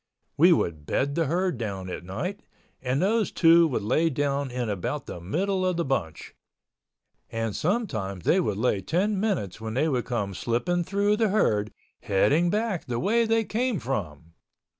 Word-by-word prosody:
We 175 Hz, +5 st, +6 dB
would 80 Hz, -, 0 dB
bed 140 Hz, +1 st, 0 dB
the 165 Hz, 0 st, 0 dB
herd 175 Hz, -3 st, 0 dB
down 100 Hz, -5 st, -4 dB
at 90 Hz, -, -6 dB
night 180 Hz, -, -4 dB, 0.4 s
and 130 Hz, +1 st, 0 dB
those 210 Hz, +4 st, +1 dB
two 165 Hz, 0 st, +6 dB
would 125 Hz, -8 st, -2 dB
lay 155 Hz, +10 st, +2 dB
down 140 Hz, -1 st, -1 dB
in 125 Hz, -1 st, -3 dB
about 105 Hz, +8 st, -3 dB
the -, -, -7 dB
middle 185 Hz, -, -1 dB
of 185 Hz, -2 st, 0 dB
the 170 Hz, -, 0 dB
bunch—and 115 Hz, -, -6 dB
sometimes 110 Hz, -, -2 dB
they 190 Hz, -, +4 dB
would 105 Hz, -, -1 dB
lay 110 Hz, -3 st, +1 dB
ten 190 Hz, -, 0 dB
minutes 175 Hz, -, -2 dB
when 110 Hz, 0 st, -5 dB
they 145 Hz, +5 st, +2 dB
would 130 Hz, -6 st, 0 dB
come 105 Hz, -6 st, -2 dB
slipping 120 Hz, -, -1 dB
through 200 Hz, +3 st, +1 dB
the 220 Hz, -1 st, +2 dB
herd, 105 Hz, -, +1 dB, 0.3 s
heading 140 Hz, -, +2 dB
back 210 Hz, -2 st, -1 dB
the 120 Hz, -3 st, -3 dB
way 230 Hz, +5 st, +2 dB
they 225 Hz, 0 st, +2 dB
came 235 Hz, -1 st, -1 dB
from. 85 Hz, -, -5 dB
140 Hz, 170 wpm, -26 LUFS, -, 0.4 s, We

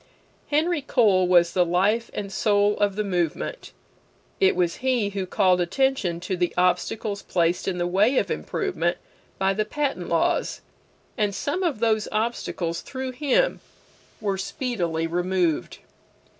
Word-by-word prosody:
Henry 310 Hz, +2 st, +1 dB
Cole 210 Hz, -9 st, +3 dB
was 175 Hz, -1 st, +4 dB
the 180 Hz, -, +4 dB
life 195 Hz, +7 st, +1 dB
and 200 Hz, -1 st, -4 dB
soul 205 Hz, -1 st, +2 dB
of 205 Hz, -2 st, +1 dB
the 215 Hz, -, -1 dB
movement. 180 Hz, -, -2 dB, 0.7 s
It 390 Hz, -, +4 dB
was 175 Hz, -2 st, 0 dB
he 250 Hz, -5 st, +1 dB
who 195 Hz, -2 st, -3 dB
called 180 Hz, -1 st, +3 dB
attention 195 Hz, -2 st, 0 dB
to 185 Hz, +1 st, -2 dB
the 175 Hz, -1 st, -1 dB
obstacles 195 Hz, +3 st, 0 dB
placed 170 Hz, 0 st, 0 dB
in 185 Hz, -2 st, -1 dB
the 175 Hz, -, 0 dB
way 205 Hz, +9 st, +2 dB
of -, -, +1 dB
improvement 355 Hz, -, -1 dB, 0.4 s
by 195 Hz, 0 st, +2 dB
the 215 Hz, +2 st, 0 dB
patent 290 Hz, +5 st, -3 dB
laws, -, -, 0 dB, 0.6 s
and 205 Hz, -2 st, +1 dB
some 290 Hz, -, -2 dB
of 335 Hz, -, 0 dB
those 220 Hz, -2 st, +2 dB
obstacles, 210 Hz, -6 st, -2 dB
through 260 Hz, -1 st, -5 dB
him, 295 Hz, -, +1 dB, 0.6 s
were 200 Hz, -3 st, -2 dB
speedily 190 Hz, -, -2 dB
removed. 175 Hz, -1 st, 0 dB
200 Hz, 145 wpm, -24 LUFS, 180-245 Hz, 0.7 s, was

